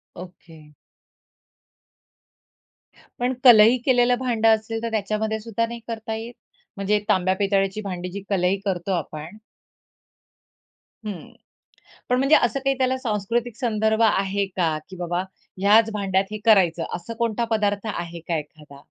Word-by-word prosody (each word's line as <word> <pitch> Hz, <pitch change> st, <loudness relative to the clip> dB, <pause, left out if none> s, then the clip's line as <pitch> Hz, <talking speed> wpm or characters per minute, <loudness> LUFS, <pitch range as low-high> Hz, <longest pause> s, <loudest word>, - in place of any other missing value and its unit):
Okay. 170 Hz, -3 st, -13 dB, 2.5 s
पण 245 Hz, +1 st, 0 dB
कलई 235 Hz, -1 st, +8 dB
केलेलं 245 Hz, -2 st, +4 dB
भांडं 230 Hz, -3 st, +2 dB
असेल 225 Hz, +1 st, -6 dB
तर 230 Hz, -, -1 dB
त्याच्यामध्ये 220 Hz, +1 st, -1 dB
सुद्धा 230 Hz, +1 st, -2 dB
नाही 235 Hz, +1 st, -7 dB
करता 225 Hz, -1 st, -5 dB
येत? 225 Hz, +2 st, -7 dB, 0.4 s
म्हणजे 200 Hz, +1 st, +1 dB
तांब्या 185 Hz, 0 st, +2 dB
पितळ्याची 195 Hz, +1 st, 0 dB
भांडीजी 180 Hz, -1 st, -5 dB
कलई 190 Hz, -1 st, +1 dB
करतो 190 Hz, -1 st, -2 dB
आपण. 160 Hz, +4 st, -7 dB, 1.7 s
हं. 200 Hz, -6 st, -7 dB, 0.8 s
पण 250 Hz, -, +3 dB
म्हणजे 275 Hz, +4 st, +4 dB
असं 240 Hz, +3 st, +2 dB
काही 270 Hz, 0 st, 0 dB
त्याला 260 Hz, 0 st, +1 dB
सांस्कृतिक 230 Hz, 0 st, -2 dB
संदर्भ 220 Hz, -2 st, 0 dB
आहे 200 Hz, -2 st, +1 dB
का? 175 Hz, -5 st, -1 dB
की 190 Hz, -, -9 dB
बाबा 175 Hz, 0 st, -2 dB, 0.4 s
ह्याच 215 Hz, +3 st, +5 dB
भांड्यात 195 Hz, -2 st, 0 dB
हे 215 Hz, -, -4 dB
करायचं 180 Hz, -7 st, +4 dB
असा 175 Hz, +6 st, -7 dB
कोणता 235 Hz, 0 st, 0 dB
पदार्थ 205 Hz, -1 st, 0 dB
आहे 170 Hz, 0 st, -6 dB
का 170 Hz, 0 st, -2 dB
एखादा? 150 Hz, -2 st, -11 dB
210 Hz, 130 wpm, -23 LUFS, 185-230 Hz, 2.5 s, कलई